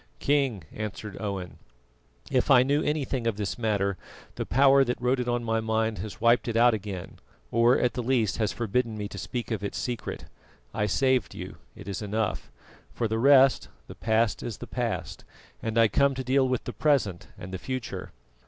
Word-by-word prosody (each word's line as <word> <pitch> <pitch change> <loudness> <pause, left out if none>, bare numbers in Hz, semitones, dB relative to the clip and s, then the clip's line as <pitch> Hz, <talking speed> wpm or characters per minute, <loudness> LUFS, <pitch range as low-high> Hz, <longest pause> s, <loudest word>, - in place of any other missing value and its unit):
"King," 135 - +1
answered 105 -1 -6
Owen, 100 -4 -5 0.7
"if 130 +2 +1
I 130 -3 +7
knew 140 +3 +1
anything 140 -6 -1
of 110 -3 0
this 105 +2 -3
matter, 100 -4 0 0.4
the - - -5
Power 135 +1 +5
that 125 0 -2
wrote 125 +1 +1
it 125 - -2
on 120 0 0
my 115 -1 0
mind 110 -1 -1
has 105 +3 -6
wiped 115 0 +3
it 115 -1 0
out 120 0 +6
again, 100 -4 -6 0.3
or, 115 +2 +4
at 125 -2 +1
the 125 - -2
least, 115 -5 +1
has 110 -3 0
forbidden 115 0 -1
me 105 -1 -3
to - - -8
speak 120 -1 -4
of 105 -3 -2
its 100 - -3
secret. 120 -2 -4 0.5
I 105 - 0
saved 130 +4 +1
you, - - -8 0.2
it - - -11
is 100 0 -4
enough; 105 0 -2 0.4
for 115 - -1
the 110 +1 -1
rest, 135 +1 +5 0.2
the - - -10
past 110 -1 +1
is 120 -4 -5
the - - -8
past, - - -4 0.4
and 110 0 -3
I 115 -1 +6
come 140 +5 +2
to 130 - -3
deal 130 +1 +2
with 130 -2 -1
the 125 - -6
present 130 - +1
and 95 +1 -9
the 95 - -4
future." 130 0 -5
115 Hz, 195 wpm, -27 LUFS, 105-130 Hz, 0.7 s, I